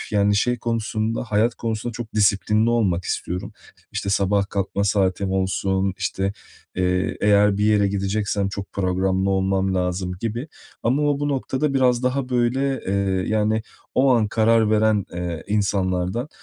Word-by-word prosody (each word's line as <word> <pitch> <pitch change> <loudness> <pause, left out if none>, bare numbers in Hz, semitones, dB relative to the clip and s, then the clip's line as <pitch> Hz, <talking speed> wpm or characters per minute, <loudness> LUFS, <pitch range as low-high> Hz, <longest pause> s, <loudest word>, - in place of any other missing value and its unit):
yani, 105 -1 +2
şey 125 +4 +1
konusunda, 115 -1 -2
hayat 115 +1 +1
konusunda 115 +1 -3
çok 110 -1 -7
disiplinli 105 +2 +2
olmak 95 -7 +1
istiyorum. 90 +1 -3 0.4
İşte, 100 - -2
sabah 100 0 +1
kalkma 100 0 -1
saatim 95 -1 +1
olsun, 95 0 0
işte, 95 +1 -1 0.4
eee, 90 0 0
eğer 105 -1 +4
bir 105 - +1
yere 105 -2 +3
gideceksem 100 0 -1
çok 100 0 -7
programlı 95 0 0
olmam 95 0 +1
lazım 90 0 -1
gibi. 115 +6 -3 0.3
Ama 135 +6 +1
o, 145 -1 +1
bu 145 - 0
noktada 140 +1 -1
biraz 125 -2 +3
daha, 125 +1 0
böyle, 130 +2 0
eee, 95 -1 0
yani, 110 0 +1 0.3
o 135 +1 +4
an 110 -3 +2
karar 110 0 +3
veren, 110 -2 +3
eee, 85 -2 -4
insanlardan. 100 +2 0
105 Hz, 145 wpm, -22 LUFS, 95-115 Hz, 0.4 s, eğer